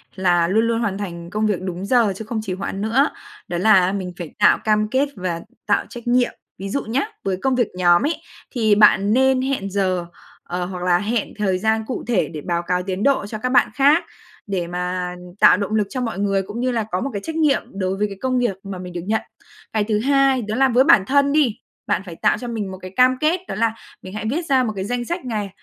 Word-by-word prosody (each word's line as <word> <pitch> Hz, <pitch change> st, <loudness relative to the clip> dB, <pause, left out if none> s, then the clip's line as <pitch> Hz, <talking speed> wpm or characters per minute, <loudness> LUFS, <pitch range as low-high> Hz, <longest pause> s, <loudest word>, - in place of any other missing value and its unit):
là 175 Hz, -3 st, +2 dB
luôn 220 Hz, +5 st, +2 dB
luôn 230 Hz, 0 st, 0 dB
hoàn 200 Hz, -4 st, -1 dB
thành 170 Hz, -4 st, -6 dB
công 215 Hz, +4 st, -1 dB
việc 205 Hz, -4 st, 0 dB
đúng 185 Hz, 0 st, -4 dB
giờ 230 Hz, -3 st, +3 dB
chứ 220 Hz, -, -7 dB
không 225 Hz, 0 st, -3 dB
trì 190 Hz, -, -3 dB
hoạn 195 Hz, +1 st, -4 dB
nữa, 245 Hz, +8 st, +2 dB, 0.4 s
đó 175 Hz, -, -3 dB
là 185 Hz, -1 st, +4 dB
mình 185 Hz, -3 st, -4 dB
phải 170 Hz, -4 st, -7 dB
tạo -, -, +6 dB
cam 215 Hz, -1 st, +2 dB
kết 270 Hz, +4 st, +1 dB
và 180 Hz, -3 st, -3 dB, 0.3 s
tạo 205 Hz, -, +2 dB
trách 240 Hz, -1 st, -10 dB
nhiệm. 245 Hz, 0 st, +3 dB, 0.3 s
Ví 195 Hz, +1 st, -6 dB
dụ 280 Hz, +7 st, -1 dB
nhá, 245 Hz, -, -1 dB, 0.2 s
với 190 Hz, -2 st, -1 dB
công 265 Hz, -1 st, +1 dB
việc 245 Hz, -4 st, +2 dB
nhóm 175 Hz, +2 st, +4 dB
ấy, 315 Hz, -, 0 dB, 0.4 s
thì 220 Hz, -5 st, +2 dB
bạn 205 Hz, -1 st, +5 dB
nên 265 Hz, +1 st, +3 dB
hẹn 260 Hz, -7 st, -2 dB
giờ, 185 Hz, -3 st, 0 dB, 0.4 s
ờ, 180 Hz, 0 st, -3 dB
hoặc 180 Hz, -1 st, -6 dB
là 180 Hz, -1 st, +3 dB
hẹn 220 Hz, +1 st, -2 dB
thời 195 Hz, -3 st, +1 dB
gian 220 Hz, +2 st, +1 dB
cụ 255 Hz, -, -4 dB
thể 230 Hz, -6 st, +1 dB
để 155 Hz, -2 st, -7 dB
báo 170 Hz, 0 st, -1 dB
cáo 180 Hz, 0 st, +1 dB
tiến 190 Hz, +1 st, -3 dB
độ 275 Hz, -5 st, +2 dB
cho 215 Hz, +1 st, -5 dB
các 255 Hz, +4 st, -2 dB
bạn 255 Hz, -, +4 dB
khác, 290 Hz, +4 st, +4 dB, 0.4 s
để 185 Hz, -4 st, -2 dB
mà 180 Hz, 0 st, -3 dB, 0.2 s
tạo -, -, +7 dB
động 200 Hz, +1 st, -3 dB
lực 210 Hz, -2 st, +1 dB
cho 255 Hz, -, -3 dB
mọi 225 Hz, -5 st, -3 dB
người 195 Hz, -1 st, +1 dB
cũng 205 Hz, +4 st, -7 dB
như 255 Hz, +1 st, 0 dB
là 230 Hz, -2 st, 0 dB
có 180 Hz, -, -1 dB
một 275 Hz, -, -2 dB
cái 200 Hz, -, -3 dB
trách 320 Hz, -, -5 dB
nhiệm 305 Hz, -4 st, +3 dB
đối 190 Hz, -1 st, -2 dB
với 210 Hz, +1 st, +1 dB
cái 200 Hz, -1 st, -9 dB
công 255 Hz, -1 st, +1 dB
việc 240 Hz, -6 st, 0 dB
mà 195 Hz, -2 st, -6 dB
mình 180 Hz, -1 st, -8 dB
được 175 Hz, -, -4 dB
nhận. 220 Hz, +1 st, +1 dB, 0.5 s
Cái 215 Hz, -1 st, +2 dB
thứ 210 Hz, 0 st, 0 dB
hai, 275 Hz, 0 st, +3 dB
đó 215 Hz, -1 st, -3 dB
là 265 Hz, +2 st, +3 dB
với 250 Hz, +1 st, +4 dB
bản 210 Hz, -, +5 dB
thân 280 Hz, +1 st, +3 dB
đi, 280 Hz, -7 st, +2 dB, 0.3 s
bạn 170 Hz, -, +1 dB
phải 175 Hz, -3 st, -8 dB
tạo -, -, +2 dB
cho 245 Hz, -, -7 dB
mình 215 Hz, -5 st, -4 dB
một 190 Hz, -, -7 dB
cái 185 Hz, -, -8 dB
cam 255 Hz, 0 st, +4 dB
kết, 315 Hz, +5 st, +2 dB
đó -, -, -4 dB
là 225 Hz, +2 st, +1 dB, 0.3 s
mình 185 Hz, -, -10 dB
hãy 215 Hz, +1 st, -5 dB
viết 330 Hz, +5 st, -2 dB
ra 265 Hz, -4 st, +3 dB
một 220 Hz, -3 st, -2 dB
cái 190 Hz, -1 st, -3 dB
danh 240 Hz, +2 st, -2 dB
sách 345 Hz, 0 st, -4 dB
ngày. 210 Hz, -5 st, -3 dB
210 Hz, 255 wpm, -21 LUFS, 185-250 Hz, 0.5 s, tạo